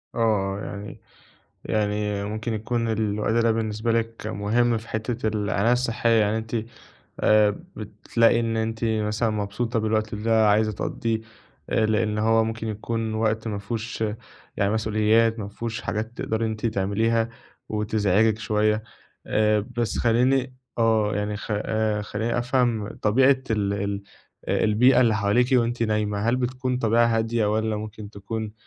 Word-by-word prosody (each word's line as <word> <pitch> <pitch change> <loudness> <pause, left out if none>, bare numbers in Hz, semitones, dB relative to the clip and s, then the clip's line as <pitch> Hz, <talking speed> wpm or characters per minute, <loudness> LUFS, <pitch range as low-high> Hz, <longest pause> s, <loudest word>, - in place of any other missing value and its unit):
آه، - - -3 0.4
آه - - -6
يعني 100 +1 -7 0.7
يعني 105 -1 -1
ممكن 110 +3 -3
يكون 115 +2 -1
الوقت 105 -1 0
ده 115 0 +3
بالنسبة 110 +1 -1
لِك 115 0 -2
مهم 115 +3 +1
في 110 +1 -12
حتّة 110 +1 -2
العناية 105 +1 +1
الصحية، 120 -1 +1
يعني 105 +1 +1
أنتِ 110 +1 -6 0.7
آآ 105 -1 +4 0.2
بتلاقي 115 0 +1
إن 115 -1 -1
أنتِ 110 0 -2
مثلًا 110 0 0
مبسوطة 110 +3 -2
بالوقت 110 -1 0
ده 110 +1 +2
عايزة 110 +1 +3
تقضِّيه 110 +2 -2 0.5
آآ 110 - +2
لأن 105 0 0
هو 110 +1 +3
ممكن 115 0 -4
يكون 110 +1 -3
وقت 110 0 0
ما 105 -2 -3
فيهوش 110 +2 -4 0.5
يعني 100 0 +1
مسؤوليات، 110 +1 +2
مافيهوش 110 +2 -5
حاجات 110 +2 -3
تقدري 110 +1 -2
إن 110 - 0
أنتِ 110 +1 -3
تعمليها 110 +2 +1 0.4
وتزعجِك 105 0 +1
شويّة، 105 0 +1 0.4
آآ 105 0 +2 0.2
بس 120 -2 -1
خلّيني 125 +2 +2 0.2
آه 110 -2 +2
يعني 105 0 -2
خ 105 - -8
آآ 105 0 0
خلّيني 110 +3 -2
أفهم 120 -4 +1
طبيعة 130 +5 +4
ال 105 -2 +1
ال 100 0 -2 0.5
البيئة 120 +4 +4
اللي 115 -3 +4
حواليكِ 105 +4 +2
وأنتِ 120 -1 +2
نايمة، 105 -2 0
هل 120 - +3
بتكون 125 0 -1
طبيعة 115 0 +3
هادية 115 -1 +1
والّا 110 0 0
ممكن 105 0 -7
تكون 110 +1 -5
110 Hz, 145 wpm, -24 LUFS, 105-115 Hz, 0.7 s, آآ